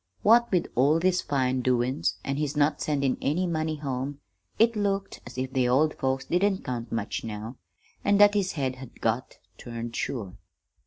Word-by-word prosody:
What 235 Hz, +3 st, +5 dB
with 180 Hz, -3 st, +2 dB
all 145 Hz, +6 st, +4 dB
these 180 Hz, +1 st, +2 dB
fine 130 Hz, -2 st, 0 dB
doin's, 120 Hz, -8 st, +1 dB
an' 135 Hz, 0 st, -1 dB
his 150 Hz, 0 st, -2 dB
not 145 Hz, 0 st, +2 dB
sendin' 140 Hz, -3 st, 0 dB
any 170 Hz, +6 st, +1 dB
money 160 Hz, -2 st, -1 dB
home, 140 Hz, -1 st, -4 dB, 0.4 s
it 230 Hz, +1 st, +4 dB
looked 200 Hz, -1 st, -1 dB
as 125 Hz, -, -11 dB
if 130 Hz, 0 st, -3 dB
the 125 Hz, -2 st, +2 dB
old 150 Hz, +5 st, +3 dB
folks 130 Hz, 0 st, -1 dB
didn't 190 Hz, +2 st, +1 dB
count 120 Hz, -2 st, -4 dB
much 115 Hz, -2 st, -3 dB
now, 110 Hz, +3 st, -6 dB, 0.5 s
an' 205 Hz, 0 st, +3 dB
that 205 Hz, 0 st, +7 dB
his 195 Hz, -2 st, 0 dB
head 130 Hz, -4 st, -2 dB
had 130 Hz, -2 st, -12 dB
got 115 Hz, +3 st, -1 dB, 0.2 s
turned 115 Hz, -1 st, -6 dB
sure. 105 Hz, -9 st, -4 dB
135 Hz, 175 wpm, -27 LUFS, 125-175 Hz, 0.5 s, that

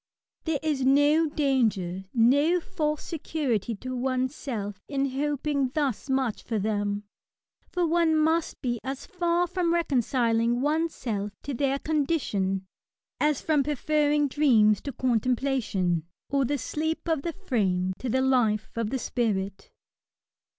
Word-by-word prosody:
There 320 Hz, -2 st, +1 dB
is 295 Hz, -4 st, 0 dB
no 290 Hz, +4 st, +4 dB
danger, 220 Hz, -, 0 dB
no 285 Hz, +9 st, +4 dB
false 305 Hz, -4 st, -2 dB
security 270 Hz, -, -2 dB
to 255 Hz, +5 st, -6 dB
one's 255 Hz, +1 st, 0 dB
self, 205 Hz, -9 st, -5 dB
in 275 Hz, -1 st, -1 dB
hoping 285 Hz, 0 st, 0 dB
thus 280 Hz, -3 st, -1 dB
much 265 Hz, -4 st, 0 dB
for 225 Hz, -, -3 dB
them; 205 Hz, 0 st, -1 dB, 0.7 s
for 355 Hz, -1 st, 0 dB
one 330 Hz, -1 st, +3 dB
must 320 Hz, +1 st, +1 dB
be 240 Hz, -2 st, -1 dB
as 270 Hz, +1 st, -5 dB
far 350 Hz, -1 st, +1 dB
from 355 Hz, -1 st, 0 dB
reconciling 240 Hz, -6 st, +1 dB
oneVself 275 Hz, -8 st, -1 dB
to 285 Hz, -, -4 dB
their 275 Hz, +2 st, +1 dB
con 300 Hz, -1 st, 0 dB
dition 195 Hz, -, 0 dB, 0.6 s
as 300 Hz, -2 st, +2 dB
from 305 Hz, -3 st, +3 dB
preferring 295 Hz, +1 st, +1 dB
dreams 230 Hz, -8 st, +4 dB
to 280 Hz, -, -5 dB
contemplation, 235 Hz, -, 0 dB, 0.2 s
or 275 Hz, -1 st, +2 dB
the 285 Hz, +4 st, 0 dB
sleep 315 Hz, +7 st, -3 dB
of 320 Hz, -4 st, +1 dB
the 335 Hz, +2 st, -3 dB
frame 190 Hz, -, 0 dB
to 255 Hz, -, -3 dB
the 260 Hz, +3 st, +2 dB
life 240 Hz, -5 st, +2 dB
of 230 Hz, -2 st, -1 dB
the 265 Hz, -, -1 dB
spirit. 200 Hz, -6 st, -2 dB
265 Hz, 135 wpm, -27 LUFS, 225-300 Hz, 0.7 s, no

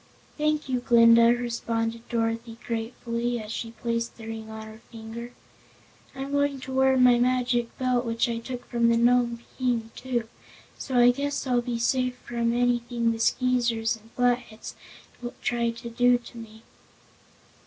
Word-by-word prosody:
"Thank 305 Hz, -1 st, 0 dB
you, 255 Hz, -1 st, 0 dB
Glinda," 230 Hz, -1 st, +6 dB
responded 230 Hz, -1 st, -3 dB
Dorothy 230 Hz, 0 st, -2 dB
gratefully, 235 Hz, +1 st, -3 dB
as 215 Hz, -1 st, -7 dB
she 230 Hz, 0 st, -4 dB
placed 230 Hz, +1 st, -3 dB
the 225 Hz, -, -10 dB
ring 220 Hz, 0 st, -7 dB
on 220 Hz, 0 st, -7 dB
her 220 Hz, +1 st, -12 dB
finger. 230 Hz, +1 st, -8 dB, 0.8 s
"I'm 270 Hz, +1 st, -5 dB
going 285 Hz, -1 st, +1 dB
to 265 Hz, -, -7 dB
wear 265 Hz, 0 st, +4 dB
my 250 Hz, -1 st, +6 dB
Magic 245 Hz, -1 st, +1 dB
Belt 250 Hz, -1 st, +1 dB
which 230 Hz, -1 st, 0 dB
I 230 Hz, -1 st, -2 dB
took 245 Hz, +1 st, -7 dB
from 235 Hz, -1 st, +1 dB
the 230 Hz, -, +3 dB
Nome 240 Hz, 0 st, +3 dB, 0.2 s
King, 235 Hz, -3 st, 0 dB
too, 240 Hz, -3 st, -2 dB, 0.5 s
so 260 Hz, -2 st, -3 dB
I 245 Hz, 0 st, +7 dB
guess 280 Hz, +3 st, -3 dB
I'll 250 Hz, -2 st, +2 dB
be 240 Hz, -1 st, -3 dB
safe 250 Hz, +1 st, 0 dB
from 235 Hz, -1 st, 0 dB
anything 240 Hz, -1 st, +1 dB
the 225 Hz, -, -4 dB
Skeezers 235 Hz, -2 st, +1 dB
and 225 Hz, 0 st, -18 dB
Flatheads 245 Hz, -3 st, -1 dB, 0.7 s
try 235 Hz, -1 st, +1 dB
to 235 Hz, +1 st, -7 dB
do 245 Hz, +1 st, +4 dB
to 240 Hz, 0 st, -14 dB
me." 220 Hz, 0 st, -12 dB
235 Hz, 155 wpm, -26 LUFS, 230-250 Hz, 0.8 s, I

